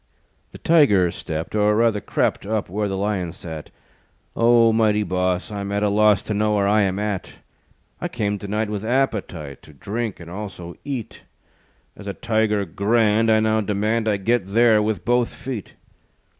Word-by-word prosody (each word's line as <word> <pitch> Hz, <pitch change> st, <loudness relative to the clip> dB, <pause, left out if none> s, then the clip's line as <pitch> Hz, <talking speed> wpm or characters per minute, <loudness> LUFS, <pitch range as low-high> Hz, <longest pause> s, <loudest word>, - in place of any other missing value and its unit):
The -, -, -10 dB
Tiger 105 Hz, -, +4 dB
stepped, 80 Hz, -1 st, -5 dB
Or, 105 Hz, 0 st, +3 dB
rather, 115 Hz, -2 st, +2 dB
crept, -, -, -1 dB
Up 110 Hz, -3 st, -2 dB
where 105 Hz, +3 st, -1 dB
the 95 Hz, -1 st, -3 dB
Lion 95 Hz, -4 st, -2 dB
sat. 80 Hz, -4 st, -8 dB, 0.7 s
"O, 115 Hz, -1 st, +5 dB
mighty 105 Hz, -2 st, +2 dB
boss 90 Hz, +2 st, -1 dB
I'm 100 Hz, -1 st, -4 dB
at 100 Hz, +1 st, 0 dB
a 105 Hz, -, +2 dB
loss 105 Hz, -1 st, +3 dB
To 110 Hz, -, -3 dB
know 105 Hz, +1 st, +1 dB
where 100 Hz, -1 st, +2 dB
I 105 Hz, +1 st, +3 dB
am 95 Hz, -1 st, 0 dB
at. 105 Hz, -2 st, -3 dB, 0.7 s
I -, -, -1 dB
came 105 Hz, -1 st, -2 dB
to 100 Hz, -, -7 dB
night 105 Hz, +2 st, -1 dB
With 105 Hz, -1 st, -3 dB
appetite 105 Hz, -, -2 dB
To 75 Hz, -, -16 dB
drink 110 Hz, -, -4 dB
and 85 Hz, -, -11 dB
also 90 Hz, -2 st, -7 dB
eat; 130 Hz, -6 st, -6 dB, 0.7 s
As 105 Hz, -, -11 dB
a 100 Hz, -, -3 dB
Tiger 110 Hz, -2 st, 0 dB
grand, 110 Hz, +5 st, +2 dB
I 110 Hz, 0 st, +4 dB
now 110 Hz, 0 st, +2 dB
demand, 110 Hz, +2 st, 0 dB
I 105 Hz, -2 st, +2 dB
get 110 Hz, 0 st, 0 dB
there 110 Hz, +1 st, +4 dB
with 105 Hz, 0 st, -2 dB
both 120 Hz, 0 st, +2 dB
feet." 125 Hz, -7 st, -7 dB
105 Hz, 175 wpm, -22 LUFS, 100-110 Hz, 0.7 s, O